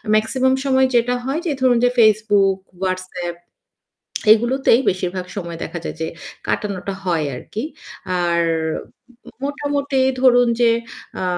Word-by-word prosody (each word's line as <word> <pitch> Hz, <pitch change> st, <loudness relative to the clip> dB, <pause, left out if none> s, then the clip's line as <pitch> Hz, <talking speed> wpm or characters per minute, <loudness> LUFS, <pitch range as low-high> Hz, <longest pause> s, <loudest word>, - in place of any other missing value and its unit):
Maximum 260 Hz, +4 st, +2 dB
সময় 265 Hz, -1 st, +4 dB
যেটা 240 Hz, +1 st, +3 dB
হয় 275 Hz, +4 st, -1 dB
যে 330 Hz, -, 0 dB
ধরুন 255 Hz, -2 st, +4 dB
যে 245 Hz, -, +5 dB
Facebook, 205 Hz, -3 st, +4 dB, 0.3 s
WhatsApp 185 Hz, -2 st, -3 dB, 1.0 s
এগুলোতেই 240 Hz, +2 st, +3 dB
বেশিরভাগ 185 Hz, 0 st, -3 dB
সময় 170 Hz, -4 st, -5 dB
দেখা 170 Hz, -, -5 dB
যায় -, -, -5 dB
যে 160 Hz, -, -1 dB, 0.4 s
কাটানোটা 200 Hz, -2 st, -2 dB
হয় 170 Hz, -5 st, 0 dB
আরকি। 210 Hz, -, -6 dB, 0.6 s
আর 170 Hz, -1 st, +2 dB, 1.0 s
মোটামুটি 285 Hz, -1 st, -1 dB, 0.2 s
ধরুন 245 Hz, -1 st, +5 dB
যে 235 Hz, -, +5 dB, 0.5 s
আ -, -, -1 dB
215 Hz, 120 wpm, -20 LUFS, 185-260 Hz, 1.0 s, যে